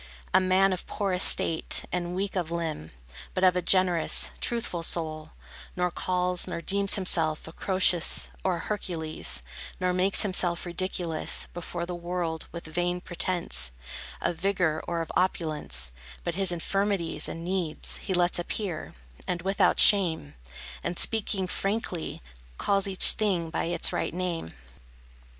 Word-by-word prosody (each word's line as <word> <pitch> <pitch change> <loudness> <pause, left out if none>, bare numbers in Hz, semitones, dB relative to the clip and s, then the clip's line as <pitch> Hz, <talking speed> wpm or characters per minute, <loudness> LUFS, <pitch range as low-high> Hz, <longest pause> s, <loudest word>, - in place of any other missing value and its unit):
A - - +7
man 190 +1 +3
of 180 - -6
poor 200 -3 -2
estate, 165 -3 +4
and 175 0 -3
weak 195 +1 -3
of 175 -4 -1
limb, 165 - -4 0.5
But 185 - -1
of 185 -1 +5
a 180 - +1
generous, 180 -2 +3
truthful 230 -8 -1
soul, 155 -2 -1 0.5
Nor 180 0 0
calls, 180 0 0
nor - - -4
deems 200 +3 +3
himself 165 -6 +1
A - - -8
Croesus, 185 -2 +2 0.2
or 185 -2 +1
a - - -5
Hercules, 160 - -4 0.4
Nor 180 0 0
makes 185 +2 +3
himself 180 -3 +1
ridiculous 175 -2 -2
Before 170 0 -5
the 180 - -5
world 175 -2 -4
with 170 - -8
vain 175 +2 -2
pretence 175 - -1 0.5
Of 170 - -1
vigor 180 -5 0
or 170 -1 -2
of 165 - -6
opulence; 155 - -1 0.3
But 170 - -2
his 190 0 +4
infirmities 195 0 -1
and 165 0 -7
needs 180 -4 -2
He 190 - -3
lets 175 0 +2
appear, 175 - -4 0.3
and 170 -1 -2
without 195 -1 +2
shame, 170 - +4 0.5
And 175 0 -3
speaking 205 -3 +2
frankly, 190 - -3 0.3
calls 200 -1 +1
each 190 -1 +7
thing 180 -7 -1
By - - -2
its 170 +1 +1
right - - -2
name. 175 - -4
180 Hz, 145 wpm, -27 LUFS, 165-190 Hz, 0.5 s, A